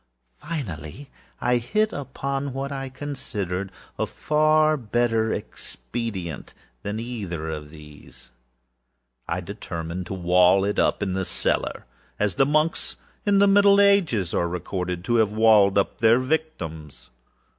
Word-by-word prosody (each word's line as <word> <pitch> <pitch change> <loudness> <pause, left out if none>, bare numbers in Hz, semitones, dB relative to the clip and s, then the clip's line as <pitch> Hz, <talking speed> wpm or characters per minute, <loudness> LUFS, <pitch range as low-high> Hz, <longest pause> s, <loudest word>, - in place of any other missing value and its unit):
Finally 130 - -6 0.3
I 125 0 +2
hit 215 - 0
upon 140 0 -4
what 135 +1 -4
I 135 -1 -4
considered 105 -9 -4 0.3
a - - 0
far 155 0 +3
better 115 -3 0
expedient 95 - -6 0.3
than 105 +2 -4
either 95 -10 -4
of 75 -1 -6
these. 75 -4 -14 1.0
I 85 +2 -2
determined 85 -2 -6
to 95 - -4
wall 90 +2 +4
it 105 - -1
up - - +2
in 95 -2 -1
the 95 - -1
cellarâas 100 +1 -2
the 135 - +3
monks 155 +2 0 0.3
of 200 -1 +4
the 200 - +6
middle 200 0 +6
ages 175 - +3
are 85 - +1
recorded 90 0 -4
to 120 +4 +1
have 110 -2 +3
walled 105 -3 +5
up 100 - 0
their 115 +1 +5
victims. 125 - -4
110 Hz, 130 wpm, -24 LUFS, 90-140 Hz, 1.0 s, the